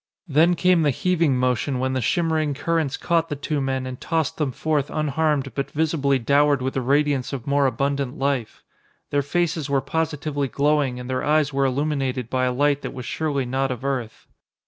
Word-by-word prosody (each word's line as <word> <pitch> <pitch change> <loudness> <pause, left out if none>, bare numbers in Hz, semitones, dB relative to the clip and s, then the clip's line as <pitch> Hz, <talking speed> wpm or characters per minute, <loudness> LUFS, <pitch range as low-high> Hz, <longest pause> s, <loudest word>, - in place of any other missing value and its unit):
Then 165 +4 +4
came 180 -1 +3
the 150 - +3
heaving 165 -1 +1
motion 125 +2 0
when 130 +1 -1
the 130 - 0
shimmering 160 0 0
currents 160 -1 -1
caught 165 -1 0
the 145 - -2
two 145 +1 -2
men 130 -1 -1
and 130 -1 -7
tossed 160 -1 -1
them 150 -4 0
forth 145 +2 -1
unharmed 150 -2 0
but 140 - -3
visibly 145 -3 +1
dowered 140 +3 +3
with 130 +1 -2
the 135 - -1
radiance 140 0 +1
of 130 -4 -5
more 140 0 +2
abundant 140 0 -1
life. 135 -4 -2 0.5
Their 145 - +2
faces 160 0 -1
were 140 -1 +2
positively 150 0 -2
glowing 140 -2 +1
and 125 - -7
their 130 0 -2
eyes 150 -1 +2
were 135 0 +2
illuminated 135 -3 -1
by 130 0 +1
a 125 - +1
light 145 +2 +1
that - - -6
was 125 -2 -6
surely 140 0 -1
not 135 +2 -1
of 125 0 -5
earth. 125 -5 -3
140 Hz, 190 wpm, -23 LUFS, 130-155 Hz, 0.5 s, Then